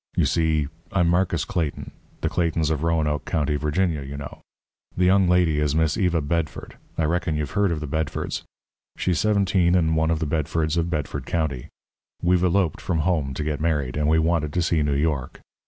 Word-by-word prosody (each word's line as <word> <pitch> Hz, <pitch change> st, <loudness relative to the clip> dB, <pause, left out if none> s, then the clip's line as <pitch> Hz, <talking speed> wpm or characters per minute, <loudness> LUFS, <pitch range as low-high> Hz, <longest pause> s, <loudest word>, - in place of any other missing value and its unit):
You -, -, +4 dB
see, 80 Hz, -3 st, +1 dB, 0.2 s
I'm 90 Hz, -3 st, +2 dB
Marcus 90 Hz, +2 st, +1 dB
Clayton 80 Hz, -5 st, -3 dB, 0.3 s
the -, -, 0 dB
Claytons 80 Hz, -2 st, 0 dB
of 75 Hz, -2 st, -1 dB
Roanoke 80 Hz, -4 st, 0 dB
County, 75 Hz, -2 st, 0 dB
Virginia, 75 Hz, +1 st, 0 dB
you 70 Hz, +1 st, -7 dB
know. 70 Hz, -, -8 dB, 0.6 s
The 90 Hz, -, +3 dB
young 95 Hz, 0 st, +4 dB
lady 90 Hz, -4 st, +3 dB
is 75 Hz, -1 st, 0 dB
Miss 80 Hz, -1 st, +2 dB
Eva 90 Hz, -5 st, +1 dB
Bedford 80 Hz, +1 st, -3 dB, 0.2 s
I 80 Hz, -, +1 dB
reckon 80 Hz, 0 st, 0 dB
you've 75 Hz, -2 st, -3 dB
heard 100 Hz, -2 st, +2 dB
of 80 Hz, -2 st, -2 dB
the 75 Hz, -, -4 dB
Bedfords. 80 Hz, 0 st, -2 dB, 0.6 s
She's 90 Hz, -4 st, 0 dB
seventeen 95 Hz, -4 st, +2 dB
and 80 Hz, -3 st, +2 dB
one 80 Hz, 0 st, +2 dB
of 80 Hz, -, +1 dB
the 80 Hz, -, -2 dB
Bedfords 80 Hz, +1 st, -1 dB
of 85 Hz, 0 st, 0 dB
Bedford 75 Hz, -4 st, -3 dB
County. 75 Hz, -7 st, -2 dB, 0.5 s
We've 90 Hz, 0 st, +2 dB
eloped 90 Hz, -2 st, +1 dB
from 80 Hz, -3 st, -1 dB
home 75 Hz, -6 st, 0 dB
to 75 Hz, -, -3 dB
get 75 Hz, -1 st, -2 dB
married, 75 Hz, -6 st, 0 dB
and 75 Hz, 0 st, 0 dB
we 80 Hz, +1 st, +4 dB
wanted 80 Hz, -2 st, +1 dB
to 90 Hz, -, +1 dB
see 80 Hz, -2 st, +1 dB
New 75 Hz, -1 st, +1 dB
York. 70 Hz, -3 st, -1 dB
80 Hz, 195 wpm, -24 LUFS, 75-85 Hz, 0.6 s, You